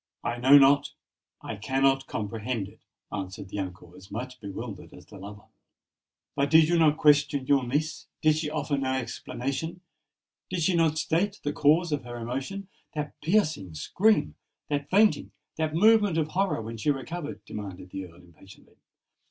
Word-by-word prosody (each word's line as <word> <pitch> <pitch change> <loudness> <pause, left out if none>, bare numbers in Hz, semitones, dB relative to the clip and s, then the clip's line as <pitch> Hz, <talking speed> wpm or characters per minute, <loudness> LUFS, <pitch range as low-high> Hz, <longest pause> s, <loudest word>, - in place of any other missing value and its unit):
"I 120 - -2
know 135 +4 +8
not—I 140 -5 0
cannot 135 +4 +1
comprehend 110 0 -3
it," - - -17 0.3
answered 95 -1 -6
the 100 - -5
uncle, 90 -2 -7
as 95 - -14
much 125 +2 -6
bewildered 100 0 -7
as 90 - -14
the 100 +1 -13
lover. 105 +2 -10 0.9
"But 140 +1 +1
did 160 +1 +6
you 170 0 +2
not 155 -2 +4
question 150 -2 +3
your 140 -1 +3
niece? 155 +5 -2
did 155 -1 +4
she 155 -1 -2
offer 145 -2 -1
no 130 -1 -1
explanation? 135 +6 -4 0.7
did 180 -3 -1
she 185 - +3
not 160 -2 +2
state 195 +6 0
the 145 - -1
cause 155 +4 +3
of 145 -3 -1
her 120 0 -7
emotion—that 150 +5 -6
piercing 155 - 0
scream—that 145 - -1
fainting—that 185 -6 +1
movement 210 -1 +5
of 155 -1 0
horror 190 - 0
when 115 +1 -6
she 115 - -1
recovered?" 145 +3 -4
demanded 95 -3 -8
the 95 -1 -6
Earl, 85 - -18
impatiently. 90 +3 -18
140 Hz, 150 wpm, -27 LUFS, 110-160 Hz, 0.9 s, know